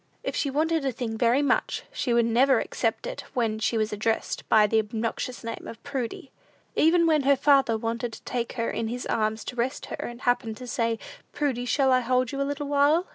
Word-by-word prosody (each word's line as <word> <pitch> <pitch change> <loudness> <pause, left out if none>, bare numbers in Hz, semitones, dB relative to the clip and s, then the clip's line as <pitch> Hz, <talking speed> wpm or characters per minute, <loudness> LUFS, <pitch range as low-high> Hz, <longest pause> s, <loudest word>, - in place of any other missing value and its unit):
If - - -3
she 285 - 0
wanted 315 +2 +1
a 270 - 0
thing 230 -2 -4
very 240 +5 +3
much, 285 - 0
she 270 - -1
would 235 -1 +4
never 250 +4 +4
accept - - -2
it - - -5
when 225 -3 0
she 225 +1 0
was 215 -1 0
addressed 220 +2 -2
by 215 -1 +6
the 220 +1 +2
obnoxious 225 +3 -3
name 230 0 -6
of 230 - -10
Prudy. 265 -2 -4 0.4
Even 335 +2 +4
when 310 -2 +3
her 280 +1 +4
father 275 -4 +4
wanted 230 +1 -3
to - - -11
take 240 -2 -3
her 230 -2 -1
in 225 - -2
his 245 +2 -4
arms 220 0 0
to - - -5
rest 245 +2 -2
her, - - -6
and 240 +1 -6
happened 240 -3 0
to 255 - -8
say, 230 -1 -1 0.4
"Prudy, 260 -5 -1
shall 265 +2 +2
I 255 - +5
hold 255 0 +1
you 275 - -3
a 275 - 0
little 285 0 -3
while?" 290 +5 +3
245 Hz, 220 wpm, -26 LUFS, 230-275 Hz, 0.4 s, by